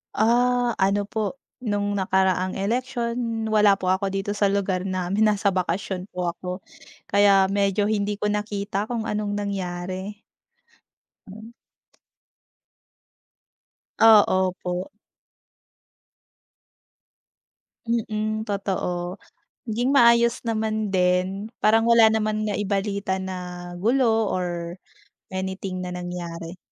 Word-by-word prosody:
Ah, 245 +2 +3
ano 195 +1 +2
po, 215 +3 -3 0.2
nung 205 -4 -1
nakaraang 190 -1 +1
eleksyon, 235 +1 -2
wala 210 -2 +5
po 185 -1 -3
ako 190 +1 0
dito 195 +1 -2
sa 205 0 +1
lugar 195 -2 0
namin, 185 +3 0
nasa 205 -1 +2
bakasyon 185 0 -2
po 180 -1 -1
ako. 180 +1 -7 0.6
Kaya 200 -1 +5
medyo 200 +1 +1
hindi 205 -1 0
ko 210 +1 -1
nakita 210 0 -2
kung 230 -2 -2
anong 210 -1 -2
nangyari. 190 0 -4 1.0
Hmm. 220 +3 -11 2.5
Ah, 220 -2 +8
opo. 185 -1 -1 3.0
Mm, 215 -2 -1
totoo. 185 -2 -3 0.5
Naging 240 +4 0
maayos 235 -2 +5
naman 220 -1 -1
din, 185 +3 0
parang 225 +1 +4
wala 230 -1 +7
naman 215 -1 0
naibalita 200 -1 -1
na 180 -1 -6
gulo 225 +1 +2
or 175 -1 -3 0.5
anything 190 0 -4
na 180 - -5
nangyari. 175 -1 -6
200 Hz, 100 wpm, -24 LUFS, 185-220 Hz, 3.0 s, Ah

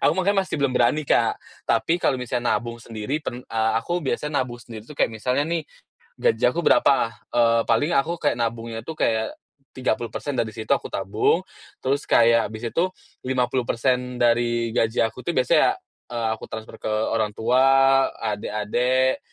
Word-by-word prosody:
aku - - +3
makanya 195 +2 +1
masih - - -4
belum 140 -3 +1
berani, 125 +4 +2
Kak. - - +2 0.3
Tapi 115 +10 +1
kalau 140 - +1
misalnya 125 -1 -1
nabung 120 -1 -4
sendiri 115 +5 -4
pen 125 -4 -6
eee, 110 0 0
aku 170 +10 -1
biasanya 150 -1 -2
nabung 120 -1 -9
sendiri 110 -2 -10
tuh 150 - -11
kayak 125 - +1
misalnya 125 +5 -1
nih, 160 0 -2 0.5
gaji 115 - +1
aku 145 - -6
berapa? 135 -7 +3 0.2
Eee, 115 -1 +3
paling 145 +9 +2
aku 165 +5 +1
kayak 145 - +1
nabungnya 115 -1 -3
tuh 160 +5 -8
kayak 110 -1 +1 0.4
30% 125 +2 -2
dari 110 -2 -1
situ 110 -2 -8
aku - - +2
tabung, 110 - 0 0.4
terus 140 +2 -1
kayak 115 0 +4
habis 110 +1 -8
itu 170 - +1 0.4
50% 125 0 0
dari 120 -1 +2
gaji 115 0 +1
aku 115 +3 -3
tuh 170 - 0
biasanya, 130 -1 +3 0.4
eee, 115 -2 -1
aku - - -10
transfer 110 0 -7
ke - - -8
orang 110 0 0
tua, 135 +3 +4 0.2
adik-adik 120 +5 0
120 Hz, 165 wpm, -23 LUFS, 115-135 Hz, 0.5 s, kayak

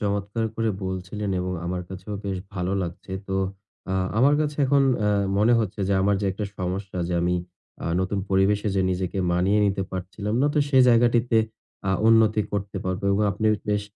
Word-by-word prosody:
চমৎকার 100 +2 -1
করে 115 -1 0
বলছিলেন 95 +2 -4
এবং 90 0 -2
আমার 90 0 -2
কাছেও 95 +2 -7
বেশ 95 -1 -2 0.2
ভালো 90 0 -2
লাগছে। 90 +2 -7 0.2
তো 95 - -1 0.6
আ - - 0 0.2
আমার 140 +4 +5
কাছে 150 -1 -1
এখন 140 +1 +4 0.2
অ্যা 105 0 +2 0.3
মনে 110 +4 +4
হচ্ছে 105 -1 -3
যে, - - +2
আমার 100 +1 +3
যে 100 - 0
একটা 105 +2 -4
সমস্যা 95 +1 -3
যে 90 - -1
আমি 90 +1 +1 0.5
আ - - -2
নতুন 95 +2 -1
পরিবেশে 100 +2 +2
যে - - +3
নিজেকে 90 0 -2
মানিয়ে 95 +4 +2
নিতে 95 -1 0
পারছিলাম 100 +3 -4
না, 145 - +4
তো 150 - +2
সেই 130 -2 +5
জায়গাটিতে 120 0 +4 0.5
আ - - +2 0.2
উন্নতি 110 -1 +4
করতে 100 -1 -3
পারবো 95 +1 -2
এবং 105 +2 +2
আপনি 110 +3 -1 0.2
বেশ 105 0 +1
100 Hz, 185 wpm, -24 LUFS, 95-110 Hz, 0.6 s, আমার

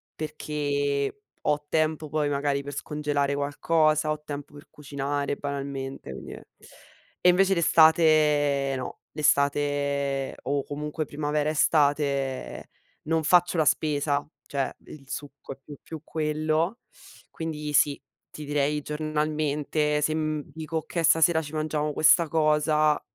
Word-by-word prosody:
perché 145 +1 -2 0.2
ho 150 0 0
tempo 155 0 0
poi 150 0 0
magari 140 0 0
per 145 - -7
scongelare 145 -2 -1
qualcosa, 155 +2 +1
ho 150 0 -4
tempo 145 -1 -7
per 145 0 -13
cucinare 140 0 -3
banalmente 140 - -5
quindi - - -9 0.9
e - - +9
invece 190 +2 +4
l'estate 155 -4 +4
no, 130 - -6
l'estate, 140 -1 +1
o 140 0 -1
comunque 150 +2 -4
primavera, 150 +1 -1
estate, 140 -3 +1 0.3
non 160 +1 0
faccio 175 +2 +4
la 155 - +4
spesa, 145 -1 +1 0.2
cioè 140 -2 -2
il 135 -3 -12
succo 140 -1 -7
è - - -20
più 145 -2 -11
più 160 -2 -9
quello. 155 +6 -1 0.5
Quindi 150 -2 -5
sì, 145 -1 +3 0.3
ti 150 - -9
direi 145 +1 0
giornalmente 150 0 -1
se, 155 +1 +1
mhmm, 155 -1 -1
dico: 160 0 -4
"Okay 165 +1 -3
stasera 160 +1 +4
ci 150 0 -9
mangiamo 155 -1 -1
questa 160 +2 +5
cosa", 155 -1 +2
150 Hz, 125 wpm, -26 LUFS, 145-155 Hz, 0.9 s, e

